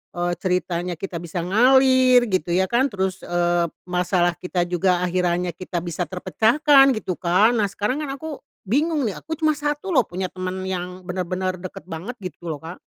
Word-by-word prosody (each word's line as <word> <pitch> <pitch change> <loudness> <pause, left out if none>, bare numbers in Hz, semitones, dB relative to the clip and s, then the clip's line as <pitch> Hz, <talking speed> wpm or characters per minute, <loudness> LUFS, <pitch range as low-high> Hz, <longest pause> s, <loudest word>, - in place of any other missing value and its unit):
eee, 175 0 -1
ceritanya 180 -1 -1
kita 175 0 -5
bisa 170 0 -4
ngalir 255 +4 +5
gitu 175 -2 0
ya 190 - +3
kan 255 +4 +3
terus, 190 -4 -2
eee, 175 0 +1 0.2
masalah 180 0 +1
kita 180 -1 -1
juga 180 +1 +1
akhirannya 180 0 0
kita 175 0 -5
bisa 175 -1 -3
terpecahkan 270 - +4
gitu 185 -4 -4
kan. 190 +6 +4
Nah, 205 - +2
sekarang 210 +8 -2
kan 275 -2 -4
aku 310 +1 -7 0.2
bingung 295 - +1
nih 210 -5 -2
aku 320 +1 -5
cuma 310 -1 +2
1 295 +5 -3
loh 255 - +3
punya 185 +1 -4
temen 185 0 -4
yang 180 0 -5
bener-bener 185 0 -3
deket 185 0 -8
banget 185 +8 -7
gitu 175 -1 -8
loh, 155 -1 -5
Kak. 170 +3 -8
185 Hz, 175 wpm, -22 LUFS, 175-245 Hz, 0.2 s, ngalir